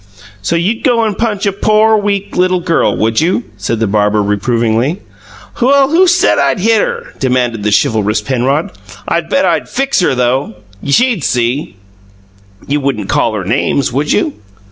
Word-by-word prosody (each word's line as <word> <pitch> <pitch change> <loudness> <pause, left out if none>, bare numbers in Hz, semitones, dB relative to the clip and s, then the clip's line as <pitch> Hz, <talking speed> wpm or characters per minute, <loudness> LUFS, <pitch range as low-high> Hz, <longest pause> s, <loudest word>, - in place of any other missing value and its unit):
"So 100 - -1
you'd 195 +7 -1
go 240 -4 +2
and 215 -2 -1
punch 210 -2 -2
a 200 - +2
pore, 215 +2 +2
weak, 200 -1 -2
little 185 0 +2
girl, 170 -1 0
would 110 +3 +1
you?" 175 +3 0
said 105 +3 -3
the 115 - +1
barber, 105 0 +1
reprovingly. 115 - 0 0.6
"Well, 275 +2 +3
who 365 +3 +4
said 360 +1 +3
I'd - - +1
hit 220 +2 +3
her?" - - -4
demanded 125 -4 0
the 105 +1 -1
chivalrous 105 0 +1
Penrod. 130 +6 -1 0.4
"I 170 - +1
bet 185 +3 0
I'd 170 -3 0
FIX 275 +2 0
her 175 -7 +1
though, 125 +1 +1
all 110 - -11 0.3
right. 140 - -4
She'd 235 - +2
see!" 125 -1 -1 0.9
"You 145 +1 -1
wouldn't 110 -8 -2
call 110 - +1
her 100 -3 -4
names, 125 +3 0
would 145 +3 -1
you?" 105 - +1
145 Hz, 175 wpm, -13 LUFS, -, 0.9 s, who